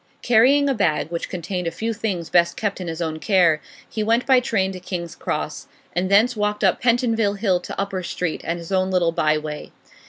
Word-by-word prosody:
Carrying 260 +5 +4
a 275 - +2
bag 170 - 0
which 170 - -4
contained 180 0 -4
a - - +2
few 225 +7 -3
things 195 -7 -3
best 170 -1 +3
kept 200 -3 -2
in 180 - -5
his 165 +1 -3
own 160 -1 -3
care, 175 -5 +3 0.3
he 220 - -4
went 230 +3 +2
by 260 -2 +5
train 195 -6 0
to 185 - -7
King's 180 -2 -5
Cross, - - -4 0.3
and 180 +1 0
thence 220 +5 +4
walked 210 0 -1
up 190 -2 +2
Pentonville 230 -4 +2
Hill 195 -3 +1
to 175 - -7
Upper 195 -1 -2
Street 175 -2 -3
and 170 +2 -2
his 170 +2 -9
own 185 0 +1
little 180 -3 +2
by 155 -2 +2
way. 150 0 -6
190 Hz, 215 wpm, -22 LUFS, 170-220 Hz, 0.3 s, by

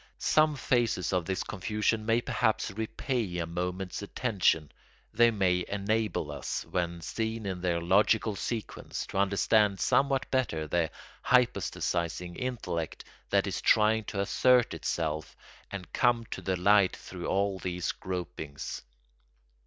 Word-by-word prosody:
Some 155 -1 +3
phases 120 -8 +1
of 90 -2 +1
this 95 +1 -1
confusion 110 +2 -1
may 115 +1 +3
perhaps 110 -2 0
repay 110 -1 -2
a 85 - -1
moment's 90 +3 -3
attention; 100 - +1 0.4
they 120 +1 +6
may 95 -5 +1
enable 100 -5 -1
us, 70 -3 -4
when 85 -1 -2
seen 110 +5 -3
in 95 -2 -3
their 85 -2 +1
logical 105 +5 +3
sequence, 110 +1 -4
to 95 - -3
understand 100 0 +3
somewhat 135 0 +2
better 105 -12 0
the 85 0 +1 0.3
hypostasising 90 -8 +1
intellect 100 -11 -3 0.3
that - - +3
is - - -3
trying 110 +1 +4
to 100 - -4
assert 125 +4 +3
itself 80 -2 -3 0.3
and 95 -5 -8
come 120 -2 +2
to - - -4
the 95 -1 -1
light 100 +1 +4
through 90 -2 -7
all 100 0 0
these 90 -1 -2
gropings. 85 -6 -5
100 Hz, 130 wpm, -29 LUFS, 90-115 Hz, 0.4 s, they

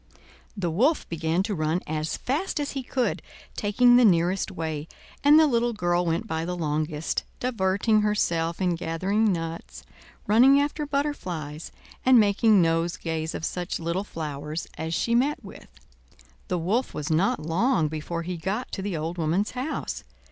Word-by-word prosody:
The 175 -4 -1
Wolf 265 - +2
began 165 +2 0
to 210 +1 -2
run 155 0 0
as 155 +1 -2
fast 305 +6 -2
as 290 -1 -2
he 270 - -3
could, 250 -1 -1 0.3
taking 245 +4 +4
the 250 - +6
nearest 180 -2 +3
way, 160 -4 -4 0.4
and 295 +2 +7
the 320 - +6
little 240 -4 +1
girl 175 -3 0
went 165 +6 0
by 160 -6 -2
the 180 +1 -3
longest, 155 -1 -2 0.2
diverting 215 -2 +1
herself 170 -6 0
in 180 -2 +1
gathering 190 +6 0
nuts, 165 -1 -5 0.4
running 255 +6 +6
after 295 +1 -1
butterflies, 180 - -3 0.3
and 255 -2 +6
making 210 -1 +4
nosegays 165 -1 -1
of 160 - -3
such 180 0 -3
little 170 +3 -2
flowers 150 -3 -5
as 160 +1 -3
she 235 - 0
met 270 +5 +1
with. - - -11 0.8
The 180 - -1
Wolf 200 +10 -1
was 150 +1 -3
not 165 +3 +2
long 165 - +1
before 160 +2 -4
he 180 +1 -4
got 200 +9 -3
to 195 - -4
the 190 -4 -3
old 165 +3 -4
woman's 170 +6 0
house. 260 +5 -4
180 Hz, 160 wpm, -26 LUFS, 165-230 Hz, 0.8 s, and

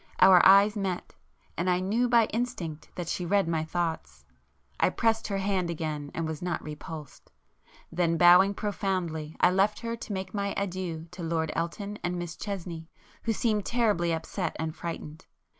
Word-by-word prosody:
Our 185 -1 +8
eyes 200 +2 +7
met; 190 -4 -3 0.4
and 180 +2 0
I 180 0 +3
knew 220 +7 +1
by 235 -2 +5
instinct 215 -10 -3
that 175 -2 -4
she 180 - -2
read 195 +1 +2
my 160 -1 0
thoughts. 160 - -3 0.5
I - - +4
pressed 225 -1 +1
her 200 - -1
hand 190 -3 0
again 155 -3 -3
and 165 - -1
was 160 -1 -5
not 175 -2 -2
repulsed,—then 160 +2 -6
bowing 180 +4 +7
profoundly, 175 -6 -2
I 180 - +6
left 195 +4 +2
her 230 0 -3
to 230 - -8
make 190 -1 -4
my 200 -1 -1
adieux 185 -4 -3
to 180 0 -9
Lord 160 -1 -1
Elton 200 +5 -3
and 175 0 -1
Miss 175 -1 -5
Chesney, 175 -5 -6 0.4
who 230 - +2
seemed 215 -2 0
terribly 210 -8 +1
upset 165 +2 -3
and 160 0 -3
frightened. 160 -3 -7
180 Hz, 165 wpm, -28 LUFS, 165-200 Hz, 0.5 s, Our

